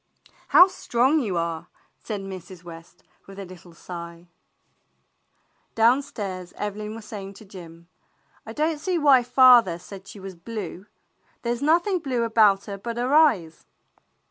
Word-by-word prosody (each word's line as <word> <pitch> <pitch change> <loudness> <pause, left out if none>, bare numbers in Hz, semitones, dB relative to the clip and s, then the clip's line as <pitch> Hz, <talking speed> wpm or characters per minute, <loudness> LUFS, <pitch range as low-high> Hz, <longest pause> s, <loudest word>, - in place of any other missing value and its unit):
"How 360 - +8
strong 270 -5 +1
you 205 -10 -2
are! 165 -1 -3 0.2
" - - -41
said 210 -3 -5
Mrs. 185 -2 -10
West, 165 -1 -13 0.2
with 195 0 -12
a 200 - -7
little 180 -2 -14
sigh. 170 0 -10 1.5
Downstairs 220 -7 0
Evelyn 210 +1 -5
was 225 -2 -10
saying 200 -2 -8
to 215 - -14
Jim: 170 -3 -13 0.6
"I - - -9
don't 310 0 -1
see 360 +3 -1
why 285 -5 +5
father 245 -7 +5
said 190 +2 -12
she 205 - -11
was 190 0 -8
blue. 190 +1 -8 0.6
There's 240 +1 -2
nothing 345 +6 +2
blue 255 -6 -2
about 215 -4 +3
her 200 -2 -7
but 235 +3 -6
her 250 +3 -1
eyes." 215 - +2
210 Hz, 145 wpm, -24 LUFS, 180-250 Hz, 1.5 s, How